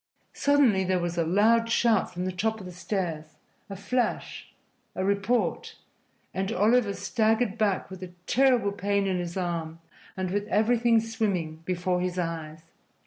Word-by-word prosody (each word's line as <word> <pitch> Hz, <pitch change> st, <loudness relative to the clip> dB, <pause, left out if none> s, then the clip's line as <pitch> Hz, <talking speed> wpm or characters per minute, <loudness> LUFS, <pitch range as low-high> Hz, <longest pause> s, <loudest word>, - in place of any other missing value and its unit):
Suddenly 275 Hz, -9 st, +3 dB
there 185 Hz, 0 st, +1 dB
was 175 Hz, 0 st, -2 dB
a 170 Hz, -, +1 dB
loud 220 Hz, +7 st, +3 dB
shout 230 Hz, -3 st, +2 dB
from 180 Hz, 0 st, -4 dB
the 185 Hz, -, -1 dB
top 220 Hz, +5 st, -1 dB
of 190 Hz, -, -9 dB
the 180 Hz, -, -7 dB
stairs 170 Hz, -5 st, -4 dB, 0.3 s
a 195 Hz, -, -6 dB
flash 240 Hz, +6 st, -2 dB, 0.4 s
a 185 Hz, -, -1 dB
report 200 Hz, +5 st, 0 dB, 0.6 s
and 190 Hz, +2 st, -2 dB
Oliver 215 Hz, +1 st, +2 dB
staggered 220 Hz, +2 st, +1 dB
back 205 Hz, -5 st, 0 dB
with 190 Hz, -1 st, -9 dB
a 185 Hz, -1 st, -7 dB
terrible 250 Hz, -5 st, +3 dB
pain 200 Hz, 0 st, 0 dB
in 185 Hz, -2 st, 0 dB
his 175 Hz, +1 st, -4 dB
arm 165 Hz, -3 st, -3 dB, 0.4 s
and 185 Hz, -1 st, -2 dB
with 205 Hz, +1 st, -1 dB
everything 230 Hz, +2 st, +3 dB
swimming 200 Hz, -8 st, -2 dB
before 180 Hz, 0 st, 0 dB
his 180 Hz, 0 st, -2 dB
eyes. 165 Hz, -2 st, -4 dB
195 Hz, 155 wpm, -27 LUFS, 180-225 Hz, 0.6 s, Suddenly